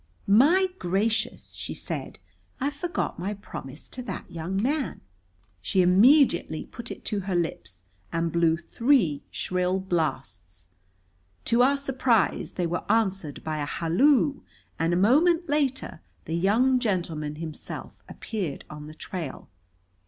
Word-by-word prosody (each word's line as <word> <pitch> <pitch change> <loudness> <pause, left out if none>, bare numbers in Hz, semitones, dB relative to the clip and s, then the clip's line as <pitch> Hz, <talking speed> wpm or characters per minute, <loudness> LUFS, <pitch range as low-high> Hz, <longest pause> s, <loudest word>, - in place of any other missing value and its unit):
"My 290 - +5
gracious!" 215 +6 -1
she - - -6
said. - - -5 0.4
"I 280 +2 0
forgot 335 - -3
my 200 +4 -2
promise 145 -7 -9
to 255 - -7
that 250 - -7
young 170 +4 -3
man!" 275 +5 -1 0.6
She 185 - +2
immediately 195 - +4
put 235 -2 -8
it - - -8
to 210 - 0
her 190 -1 -2
lips 90 - -3 0.3
and 165 0 0
blew 165 -1 +3
three 175 - +2
shrill 180 +1 -1
blasts. 105 - -3 0.8
To 235 +1 +4
our 275 +3 +4
surprise 255 -7 +1
they 180 - -1
were 175 +1 -2
answered 195 -9 0
by 155 -1 -2
a 145 - -1
halloo, 270 - +2 0.4
and 165 +1 +1
a 175 - +2
moment 325 - +4
later 280 - -1 0.2
the 160 - -4
young 225 +9 +3
gentleman 170 - -2
himself 155 -1 -7
appeared 190 - -5
on 150 0 -8
the 155 - -10
trail. 165 -5 -6
190 Hz, 135 wpm, -26 LUFS, 160-250 Hz, 0.8 s, My